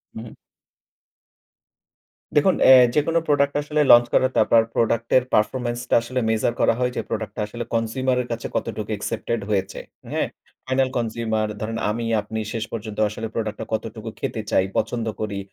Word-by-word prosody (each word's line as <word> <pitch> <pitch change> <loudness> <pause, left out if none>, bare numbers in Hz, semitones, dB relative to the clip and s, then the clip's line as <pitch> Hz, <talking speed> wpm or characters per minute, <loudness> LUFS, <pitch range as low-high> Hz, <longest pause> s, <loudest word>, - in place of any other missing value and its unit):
হুম। 110 0 -8 2.0
দেখুন 180 +6 +4
অ্যা 130 - +10 0.2
যেকোনো 165 +3 +2
প্রোডাক্ট 140 -1 +2
আসলে 150 +1 0
লঞ্চ 120 0 +8
করা, 130 - +4
তারপর 115 - +5
প্রোডাক্টের 115 +2 +2
পারফরম্যান্স 120 +2 +1
টা - - +4
আসলে 130 +2 -3
মেজার 110 +1 +1
করা - - +4
হয় 125 0 +1
যে, - - -1
প্রোডাক্ট 110 -1 -3
টা - - -1
আসলে 120 +3 -5
কনসিউমার 125 +3 0
এর 125 - -7
কাছে 115 0 -3
কতটুকু 110 -2 -3
অ্যাকসেপ্টেড 115 +2 -3
হয়েছে। 95 -2 -1 0.3
হ্যাঁ, - - 0 0.4
ফাইনাল 130 0 +1
কনসিউমার 110 -2 -1
ধরেন 115 +1 -3
আমি 115 +2 -3 0.2
আপনি 110 +2 -5
শেষ 115 -2 -2
পর্যন্ত 110 -2 -6
আসলে 110 +2 -5
প্রোডাক্ট 110 -2 -3
টা - - -4
কতটুকু 110 0 -4
খেতে 110 - -3
চাই, 95 - +3
পছন্দ 115 +1 -1 0.2
করি, 105 -2 -3
115 Hz, 160 wpm, -23 LUFS, 110-125 Hz, 2.0 s, অ্যা